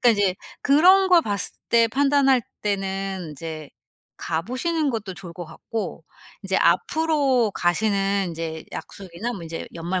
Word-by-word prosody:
그러니까 245 - +5
이제 205 -4 +2 0.3
그런 370 +7 +6
걸 355 -2 +6
봤을 205 -6 -2
때 230 -1 +4
판단할 275 0 +3 0.2
때는 195 -3 -2
인제 155 0 -7 0.5
가 160 -1 -1
보시는 295 - -1
것도 215 -6 -3
좋을 175 -2 -9
것 175 0 -6
같고 220 +7 -6 0.4
인제 - - 0
앞으로 290 - +2
가시는 195 +2 +1
인제 160 -1 -5
약속이나 195 +4 -6
뭐 195 - -7
인제 165 0 -6
연말 170 +2 -2
200 Hz, 295 characters per minute, -23 LUFS, 175-265 Hz, 0.5 s, 그런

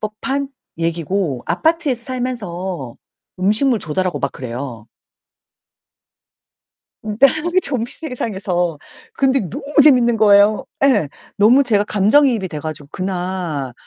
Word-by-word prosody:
법한 270 +6 -3 0.3
얘기고 165 -3 -2
아파트에서 285 - 0
살면서 190 - -5 0.4
음식물 215 +6 +2
조달하고 170 -1 -2
막 140 -1 -1
그래요. 120 -2 -7 2.2
네. 210 -1 -5 0.3
그 370 - +4
좀비 245 -8 -3
세상에서 190 - -3 0.4
근데 270 0 +2
너무 275 +3 -7 0.2
재밌는 245 -5 +5
거예요 205 0 +5 0.2
예. 210 - +2 0.3
너무 240 +7 +5
제가 210 -5 +2
감정이입이 215 +1 +3
돼 155 -4 -6
가지고 155 -1 -7
그날 180 -7 -3
200 Hz, 250 characters per minute, -18 LUFS, 170-250 Hz, 2.2 s, 재밌는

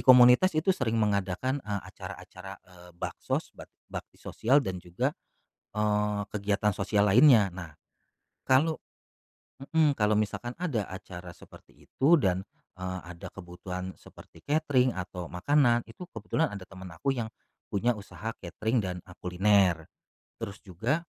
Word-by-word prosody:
komunitas 125 +7 +7
itu 165 +5 +3
sering 115 -9 -1
mengadakan, 105 +5 0
eee, 105 -4 -3
acara-acara, 95 0 -9
eee, 90 -1 -16
baksos, - - -3
bak - - -12 0.2
bakti - - -7
sosial 135 +5 +2
dan 90 -1 -3
juga, 85 0 -1 0.6
eee, 105 -1 +1
kegiatan 105 0 +1
sosial 105 +1 +2
lainnya. 115 -3 +7
Nah, 85 -4 -9 0.7
kalau 155 +5 +4 0.8
mhm, 150 +2 +3 0.2
misalkan 105 +3 -1
ada 145 - -2
acara 90 -2 -9
seperti - - -17
itu 155 +6 +4
dan, 95 - +1 0.3
eee, 95 0 -3
ada 85 - -9
kebutuhan 90 0 -7
seperti - - -15
katering 140 -5 +2
atau 90 -1 -5
makanan, 120 +5 +3
itu 145 +11 -11
kebetulan 160 +1 0
ada 100 -6 -7
temen 95 0 -10
aku 135 +12 0
yang 120 -4 -2 0.4
punya 115 +5 +1
usaha 110 0 -6
katering 110 +7 -1
dan 90 -3 -2
a - - -15
kuliner, 90 -2 +3 0.5
terus 100 -1 -6
juga 120 - -2
105 Hz, 135 wpm, -29 LUFS, 95-125 Hz, 0.8 s, komunitas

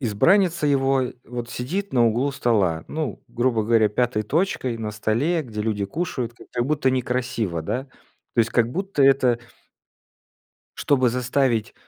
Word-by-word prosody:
избранница 160 - +3
его, 135 -1 +2 0.2
вот 120 0 -6
сидит 185 +11 -3
на 120 -2 +4
углу 125 +6 +1
стола, 100 -11 +1
ну, 155 -3 -4
грубо 120 -2 0
говоря, 110 -1 +4
пятой 115 0 0
точкой 130 - -1
на 110 -1 -3
столе, 135 +11 0
где 110 -5 -6
люди 105 -2 -1
кушают, 130 - -3
как-то, - - -17
как 120 - +1
будто 150 -3 +1
некрасиво, 125 -8 -1
да? 115 +10 -3 0.5
То 120 - +4
есть 115 0 +1
как 115 0 +2
будто 190 -2 -1
это 130 -3 +4 1.4
чтобы 130 -3 +2
заставить, 125 -2 0
125 Hz, 145 wpm, -23 LUFS, 115-140 Hz, 1.4 s, на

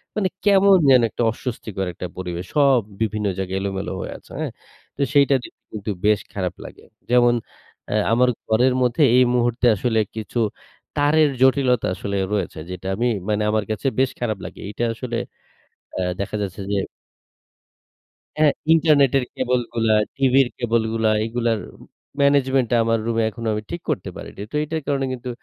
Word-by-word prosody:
মানে 195 -3 +1 0.2
কেমন 200 -1 +6
যেন 130 -2 +7
একটা 120 - -2
অস্বস্তিকর 110 -6 -5
একটা 90 - -6
পরিবেশ 90 -1 -4
সব 140 -3 +5 0.2
বিভিন্ন 105 -1 0
জায়গায় 95 0 -2
এলোমেলো 95 0 -3
হয়ে - - -5
আছে। - - -20
হ্যাঁ? - - -2 0.5
তো 140 - -3
সেইটা 140 -1 +5
দেখতে - - -13
কিন্তু 105 0 -4
বেশ 105 0 +4
খারাপ 90 -3 -2
লাগে। - - -12 0.3
যেমন 120 -1 +5 0.6
অ্যা - - -1 0.2
আমার 125 +2 +4 0.2
ঘরের 125 +4 +3
মধ্যে 125 +4 +2
এই 130 - +7
মুহূর্তে 120 0 +1
আসলে 115 +2 0 0.2
কিছু 110 +2 -4 0.6
তারের 150 +1 +4
জটিলতা 130 -2 +3
আসলে 100 0 -3 0.2
রয়েছে, 95 -6 -2
যেটা 90 +1 -6
আমি 120 +3 0 0.2
মানে 105 0 +1
আমার 110 -1 +1
কাছে 110 +5 -2
বেশ 130 -1 +2
খারাপ 110 -4 -1
লাগে। - - -9
এইটা 105 +3 -4
আসলে 120 0 -4 0.8
অ্যা 95 - -1 0.2
দেখা 100 - -4
যাচ্ছে 100 0 -4
যে 100 - +1 1.6
হ্যাঁ, 150 -2 +5 0.2
ইন্টারনেটের 140 -5 +4
কেবল 125 -1 +1
গুলা, 115 -2 +2 0.2
টিভির 135 -1 +4
কেবল 115 -2 +1
গুলা, 110 -1 +2
এগুলার 115 -1 0 0.6
ম্যানেজমেন্টটা 135 -3 +3
আমার 115 0 +1
রুমে 115 -1 +1
এখনো 115 +1 -6
আমি 105 0 -3
ঠিক 170 0 -4
করতে 90 - -2
পারিনি। - - -9
তো - - -6
এটার 160 +1 -3
কারণে 140 -2 0
কিন্তু 125 0 -6
120 Hz, 160 wpm, -22 LUFS, 105-135 Hz, 1.6 s, যেন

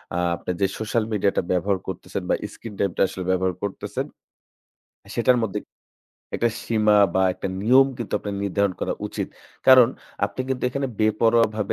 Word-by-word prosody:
আ - - 0 0.2
আপনার 90 - -4
যে - - +5
social 110 +1 0
media 100 -1 +2
টা - - +4
ব্যবহার 95 +2 +1
করতেছেন 95 +1 -5
বা - - +4 0.2
screen 115 -3 -9
time 100 -3 +1
টা - - +1
আসলে 95 - -6
ব্যবহার 95 0 +1
করতেছেন 100 -1 -3 1.1
সেটার 125 +1 +4
মধ্যে 100 - -2 0.8
একটা 120 - +2 0.2
সীমা 105 -2 +3 0.2
বা 95 - +3
একটা 95 - -4
নিয়ম 130 +4 +6
কিন্তু 115 - -5
আপনার 100 -1 -5
নির্ধারণ 100 0 +1
করা - - -1
উচিত। - - -4 0.4
কারণ 130 -3 +8 0.4
আপনি 100 +5 -4
কিন্তু 130 -1 -2
এখানে 140 +2 -2
বেপরোয়াভাবে 110 -1 +2
105 Hz, 165 wpm, -23 LUFS, 100-115 Hz, 1.1 s, কারণ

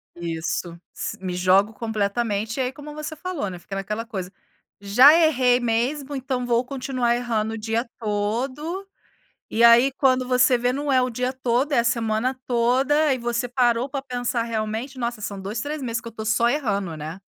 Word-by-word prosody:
Isso, 170 0 -4
si - - -5
me 185 -1 -3
jogo 190 +4 +3
completamente, 220 +1 -2
aí 255 0 0
como 295 +2 -10
você 305 +1 -6
falou, 325 - -4
né, 180 - -8
fica 195 - -8
naquela 210 +4 -3
coisa, 190 -6 -6 0.5
já 245 +9 +7
errei 260 -7 +4
mesmo 255 +5 -1
então 260 -2 -2
vou 240 0 +2
continuar 255 -2 -1
errando 225 -3 -1
o - - -4
dia 225 +2 -2
todo, 255 - -2 0.6
e 230 +2 +1
aí 235 +3 +7
quando 255 -2 +2
você 250 0 +4
vê 245 +1 +1
não 285 +1 -2
é 260 -1 +4
o 250 - 0
dia 250 +2 -2
todo, 260 +3 0
é - - +4
a - - +2
semana 235 +2 0
toda, 265 +5 +2
e - - -2
você 240 0 -2
parou 245 0 +1
para 275 0 -3
pensar 245 -2 -2
realmente, 225 +3 -3
nossa 235 -3 -3
são 200 -1 -5
2, 205 +4 -4
3 295 +2 -4
meses 230 -2 -2
que 230 - -10
eu - - -4
estou 220 -1 -7
só 220 +2 +3
errando, 200 - -1
né. 160 +5 -7
240 Hz, 185 wpm, -23 LUFS, 215-260 Hz, 0.6 s, já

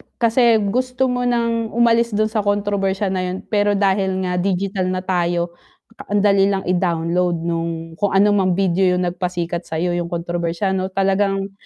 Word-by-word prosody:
kasi 235 0 +3 0.2
gusto 255 +1 0
mo 245 0 -1
ng 230 -2 -1
umalis 235 -1 +3
dun 215 +1 +1
sa 215 - 0
kontrobersya 205 -1 0
na 185 - -1
yun 185 +1 -5
pero 205 -1 +2
dahil 190 -1 +1
nga 180 -1 -1
digital 190 0 -1
na 185 0 -2
tayo, 175 -2 -1 0.6
ang 205 0 +1
dali 200 -1 +4
lang 195 -1 -1
i-download 175 -1 0
nung 170 0 -1 0.3
kung 205 -2 0
anumang 195 -2 +3
video 185 -1 +2
yung 180 - 0
nag-pasikat 175 -1 -3
sayo 165 +2 -1
yung 175 -1 -2
kontrobersyal 170 +2 -2
ano 190 0 -1
talagang, 195 +1 0
190 Hz, 160 wpm, -20 LUFS, 180-205 Hz, 0.6 s, dali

